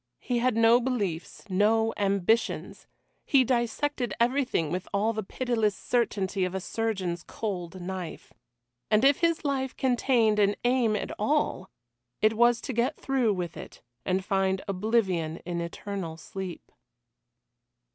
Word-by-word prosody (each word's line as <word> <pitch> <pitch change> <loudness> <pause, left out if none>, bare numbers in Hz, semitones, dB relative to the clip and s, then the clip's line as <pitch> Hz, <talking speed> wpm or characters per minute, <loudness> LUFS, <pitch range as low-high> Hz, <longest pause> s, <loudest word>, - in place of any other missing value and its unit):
He 245 -2 -1
had 245 -1 +1
no 230 +2 +6
beliefs 205 -10 -3
no 220 +3 +2
ambitions. 200 +3 0 0.4
He 275 -2 +4
dissected 245 0 -1
everything 245 - +1
with 180 +1 -3
all 210 +3 +1
the 215 - -2
pitiless 225 -1 -1
certainty 200 -6 0
of 180 +1 -2
a - - 0
surgeon's 190 -4 -2
cold 185 -4 -5
knife. 180 -2 -6 0.6
And 215 +4 +4
if 280 0 +5
his 335 -2 +1
life 265 -2 -1
contained 240 -4 +2
an 205 0 +3
aim 240 -3 +2
at 210 - -3
all, 215 -5 0 0.5
it 215 +1 +3
was 240 +1 +4
to 260 - -4
get 240 +6 +1
through 255 -6 +1
with 175 -3 -4
it - - -10 0.2
and 185 0 -1
find 190 -1 +1
oblivion 190 -5 0
in 170 -1 -2
eternal 170 -1 -5
sleep. 185 0 -7
215 Hz, 135 wpm, -28 LUFS, 190-245 Hz, 0.6 s, no